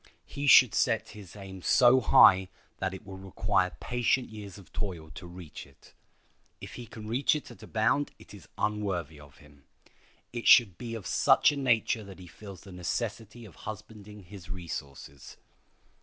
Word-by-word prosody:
He 145 Hz, 0 st, -5 dB
should 125 Hz, -3 st, +8 dB
set 110 Hz, -, 0 dB
his 105 Hz, -3 st, -12 dB
aim 95 Hz, -2 st, -10 dB
so 125 Hz, +5 st, +5 dB
high 95 Hz, -4 st, +6 dB, 0.3 s
that 95 Hz, 0 st, -1 dB
it 95 Hz, -, -12 dB
will 95 Hz, -1 st, -9 dB
require 95 Hz, -1 st, -1 dB
patient 125 Hz, +1 st, 0 dB
years 105 Hz, -3 st, -9 dB
of 100 Hz, -, -16 dB
toil 85 Hz, -7 st, -5 dB
to 90 Hz, -, -10 dB
reach 85 Hz, -5 st, -11 dB
it. 70 Hz, -, -22 dB, 0.7 s
If -, -, -10 dB
he 120 Hz, -2 st, -9 dB
can 105 Hz, 0 st, -10 dB
reach 125 Hz, +7 st, +1 dB
it 150 Hz, -, -6 dB
at -, -, -15 dB
a -, -, -11 dB
bound 110 Hz, +6 st, +1 dB
it -, -, -16 dB
is 95 Hz, -7 st, -13 dB
unworthy 95 Hz, -8 st, -2 dB
of 70 Hz, -3 st, -16 dB
him. 70 Hz, -1 st, -20 dB, 0.7 s
It 120 Hz, -1 st, -4 dB
should 100 Hz, -8 st, +6 dB
be 115 Hz, -2 st, -6 dB
of 110 Hz, -4 st, -8 dB
such -, -, +4 dB
a -, -, -4 dB
nature 120 Hz, -4 st, +1 dB
that 100 Hz, -2 st, -12 dB
he 90 Hz, -, -12 dB
feels 95 Hz, +1 st, -12 dB
the 100 Hz, -, -13 dB
necessity 110 Hz, +5 st, -5 dB
of 100 Hz, -, -14 dB
husbanding 105 Hz, -1 st, -10 dB
his 90 Hz, 0 st, -13 dB
resources. 70 Hz, -6 st, -8 dB
100 Hz, 175 wpm, -29 LUFS, 90-115 Hz, 0.7 s, should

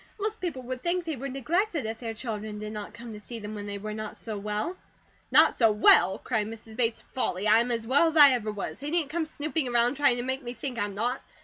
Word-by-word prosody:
Most 430 Hz, +1 st, -2 dB
people 305 Hz, -8 st, -4 dB
would 250 Hz, 0 st, -5 dB
think 350 Hz, 0 st, 0 dB
they 320 Hz, -2 st, -2 dB
were 275 Hz, +2 st, -5 dB
neglected, 310 Hz, -, -1 dB
if 220 Hz, 0 st, -4 dB
their 225 Hz, -2 st, -5 dB
children 215 Hz, -2 st, -5 dB
did 215 Hz, 0 st, -6 dB
NOT 210 Hz, -1 st, -6 dB
come 235 Hz, -1 st, -9 dB
to 210 Hz, -, -8 dB
see 230 Hz, +3 st, -8 dB
them 210 Hz, -1 st, -7 dB
when 205 Hz, -1 st, -6 dB
they 200 Hz, 0 st, -4 dB
were 210 Hz, +1 st, -5 dB
not 215 Hz, 0 st, -6 dB
so 220 Hz, -2 st, -6 dB
well." 210 Hz, -, -3 dB, 0.5 s
"Not -, -, +6 dB
so 225 Hz, -3 st, +4 dB
well!" 190 Hz, -3 st, +6 dB
cried 210 Hz, -2 st, -2 dB
Mrs. 225 Hz, 0 st, -10 dB
Bates. 230 Hz, -1 st, 0 dB
"Folly! 205 Hz, -5 st, -1 dB
I 220 Hz, +2 st, +6 dB
am 240 Hz, +1 st, 0 dB
as 230 Hz, -2 st, -1 dB
well 280 Hz, +7 st, +4 dB
as 320 Hz, 0 st, -1 dB
I 290 Hz, -2 st, +9 dB
ever 225 Hz, -4 st, -1 dB
was. 205 Hz, -1 st, -5 dB
They 285 Hz, +2 st, -5 dB
needn't 320 Hz, -3 st, 0 dB
come 325 Hz, -1 st, -1 dB
snooping 305 Hz, -1 st, -2 dB
around, 240 Hz, +2 st, +2 dB
trying 275 Hz, -4 st, +3 dB
to 240 Hz, -, -2 dB
make 260 Hz, +2 st, -2 dB
me 245 Hz, -1 st, -6 dB
think 245 Hz, 0 st, -4 dB
I'm 205 Hz, -1 st, -2 dB
not. 240 Hz, +5 st, -1 dB
240 Hz, 255 wpm, -27 LUFS, 215-280 Hz, 0.5 s, I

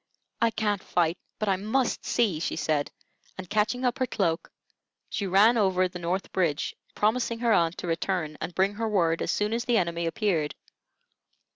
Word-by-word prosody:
"I 230 Hz, -, +5 dB
can't 215 Hz, -3 st, -1 dB
fight, 175 Hz, -2 st, 0 dB, 0.2 s
but 215 Hz, -, -2 dB
I 195 Hz, -1 st, +2 dB
must 225 Hz, +6 st, 0 dB
see," 210 Hz, -10 st, +1 dB
she -, -, -2 dB
said; 150 Hz, -2 st, 0 dB, 0.5 s
and 185 Hz, -1 st, -7 dB
catching 215 Hz, +6 st, 0 dB
up 245 Hz, +1 st, 0 dB
her 255 Hz, -, +1 dB
cloak, 170 Hz, -7 st, -1 dB, 0.6 s
she 200 Hz, -, -2 dB
ran 205 Hz, +6 st, +5 dB
over 185 Hz, -2 st, +3 dB
the 180 Hz, 0 st, -8 dB
North 175 Hz, +3 st, -2 dB
Bridge, 165 Hz, -6 st, 0 dB, 0.2 s
promising 230 Hz, +2 st, +1 dB
her 230 Hz, -1 st, +2 dB
aunt 170 Hz, -2 st, +2 dB
to -, -, -5 dB
return 165 Hz, -2 st, -1 dB
and 165 Hz, +2 st, -5 dB
bring 195 Hz, +2 st, +2 dB
her 225 Hz, +1 st, -2 dB
word 170 Hz, -5 st, +2 dB
as -, -, -2 dB
soon 210 Hz, +1 st, 0 dB
as 235 Hz, +1 st, -1 dB
the 240 Hz, -2 st, +3 dB
enemy 170 Hz, -2 st, 0 dB
appeared. 165 Hz, -6 st, 0 dB
195 Hz, 180 wpm, -27 LUFS, 170-220 Hz, 0.6 s, I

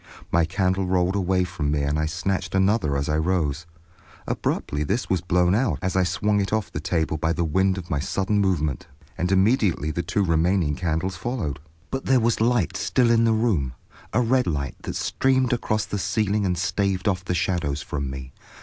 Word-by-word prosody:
My 85 Hz, -1 st, +3 dB
candle 95 Hz, +2 st, 0 dB
rolled 90 Hz, +1 st, +1 dB
away 95 Hz, -1 st, +1 dB
from 85 Hz, -5 st, -3 dB
me 75 Hz, -1 st, 0 dB
and 70 Hz, +2 st, 0 dB
I 80 Hz, -, 0 dB
snatched 90 Hz, +4 st, -2 dB
another 95 Hz, -6 st, +2 dB
as 70 Hz, -, -2 dB
I 75 Hz, +1 st, +1 dB
rose. 80 Hz, -2 st, -1 dB, 0.6 s
Abruptly 75 Hz, +1 st, -2 dB
this 100 Hz, -, -2 dB
was 95 Hz, -4 st, +2 dB
blown 90 Hz, 0 st, +2 dB
out 105 Hz, -, +1 dB
as 95 Hz, 0 st, -1 dB
I 95 Hz, -, +4 dB
swung 100 Hz, +3 st, +1 dB
it 100 Hz, -, -2 dB
off 110 Hz, -2 st, -1 dB
the -, -, -4 dB
table 80 Hz, -1 st, -1 dB
by 80 Hz, +2 st, 0 dB
the 85 Hz, -, -1 dB
wind 95 Hz, +4 st, +1 dB
of 85 Hz, -2 st, -7 dB
my 70 Hz, -, +1 dB
sudden 100 Hz, +7 st, 0 dB
movement, 80 Hz, -8 st, 0 dB, 0.3 s
and 90 Hz, +2 st, -1 dB
immediately 95 Hz, -, +2 dB
the 85 Hz, -, -2 dB
two 95 Hz, +4 st, 0 dB
remaining 85 Hz, -1 st, +2 dB
candles 85 Hz, +2 st, -2 dB
followed. 85 Hz, -, -3 dB, 0.3 s
But 135 Hz, 0 st, -3 dB
there 130 Hz, -1 st, +4 dB
was 115 Hz, -1 st, +1 dB
light 120 Hz, -5 st, +2 dB
still 120 Hz, -2 st, +2 dB
in 115 Hz, 0 st, +4 dB
the 115 Hz, -, +3 dB
room, 100 Hz, -, +1 dB, 0.4 s
a 125 Hz, -, +2 dB
red 125 Hz, 0 st, +2 dB
light, 70 Hz, -5 st, -2 dB
that -, -, -5 dB
streamed 130 Hz, -2 st, +1 dB
across 110 Hz, -3 st, 0 dB
the 105 Hz, -, -3 dB
ceiling 105 Hz, 0 st, 0 dB
and 90 Hz, -1 st, 0 dB
staved 95 Hz, +2 st, 0 dB
off 95 Hz, -3 st, 0 dB
the 90 Hz, -1 st, -2 dB
shadows 85 Hz, -5 st, -1 dB
from 70 Hz, -2 st, -3 dB
me. 65 Hz, 0 st, -7 dB
90 Hz, 200 wpm, -24 LUFS, 80-105 Hz, 0.6 s, I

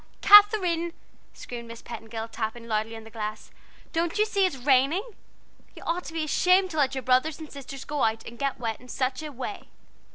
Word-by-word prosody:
Kather 415 Hz, -1 st, +8 dB
ine!" 335 Hz, 0 st, -1 dB, 0.4 s
screamed 235 Hz, -1 st, -8 dB
Miss 230 Hz, 0 st, -10 dB
Petingill, 225 Hz, -1 st, -6 dB
tapping 230 Hz, +1 st, -5 dB
loudly 220 Hz, 0 st, -1 dB
on 225 Hz, -, -9 dB
the 225 Hz, -, -13 dB
glass. 215 Hz, -1 st, -6 dB, 0.4 s
"Don't 335 Hz, +3 st, 0 dB
you 425 Hz, -, +4 dB
see 395 Hz, -3 st, +2 dB
that 335 Hz, -, -8 dB
it's 250 Hz, -1 st, -13 dB
raining? 275 Hz, +7 st, +4 dB, 0.7 s
you -, -, -11 dB
ought 345 Hz, +2 st, -2 dB
to -, -, -8 dB
be 325 Hz, -1 st, -1 dB
ashamed 365 Hz, +4 st, +3 dB
to 315 Hz, -, -5 dB
let 275 Hz, -2 st, +2 dB
your 265 Hz, -, -2 dB
little -, -, -26 dB
brothers 255 Hz, +5 st, +2 dB
and 315 Hz, -2 st, -10 dB
sisters 275 Hz, -1 st, -8 dB
go 295 Hz, -2 st, -3 dB
out 225 Hz, 0 st, 0 dB
and 235 Hz, 0 st, -10 dB
get 275 Hz, -3 st, -1 dB
wet 225 Hz, -2 st, -3 dB
in 250 Hz, -, -15 dB
such 255 Hz, +2 st, -2 dB
a 305 Hz, -1 st, -6 dB
way!" 270 Hz, +10 st, -6 dB
270 Hz, 220 wpm, -26 LUFS, 230-335 Hz, 0.7 s, Kather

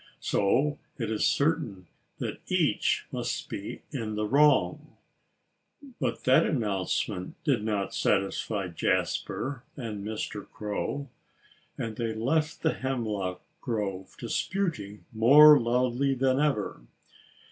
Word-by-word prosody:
So 140 Hz, +9 st, +1 dB, 0.2 s
it 115 Hz, -3 st, -2 dB
is 110 Hz, -, +2 dB
certain 140 Hz, -, 0 dB, 0.3 s
that -, -, -4 dB
each -, -, +1 dB
must -, -, -3 dB
be -, -, -6 dB
in 110 Hz, -1 st, -3 dB
the 105 Hz, 0 st, -1 dB
wrong." 145 Hz, +6 st, +3 dB, 1.0 s
But 120 Hz, -5 st, -2 dB
that 130 Hz, -, +5 dB
announcement 100 Hz, -, -1 dB
did 135 Hz, -9 st, +1 dB
not 105 Hz, -3 st, -1 dB
satisfy 100 Hz, 0 st, 0 dB
Jasper 125 Hz, -, -1 dB, 0.2 s
and 110 Hz, -6 st, -5 dB
Mr. 105 Hz, -1 st, -5 dB
Crow. 110 Hz, +7 st, -4 dB, 0.7 s
And 110 Hz, -1 st, -4 dB
they 115 Hz, -2 st, -2 dB
left 155 Hz, +8 st, 0 dB
the 160 Hz, -, +3 dB
hemlock 105 Hz, -8 st, -3 dB, 0.2 s
grove, 100 Hz, -6 st, -3 dB
disputing 150 Hz, -, -3 dB
more 145 Hz, +7 st, +8 dB
loudly 125 Hz, +3 st, +1 dB
than 130 Hz, +1 st, +2 dB
ever. 140 Hz, -, 0 dB
115 Hz, 110 wpm, -28 LUFS, 105-140 Hz, 1.0 s, more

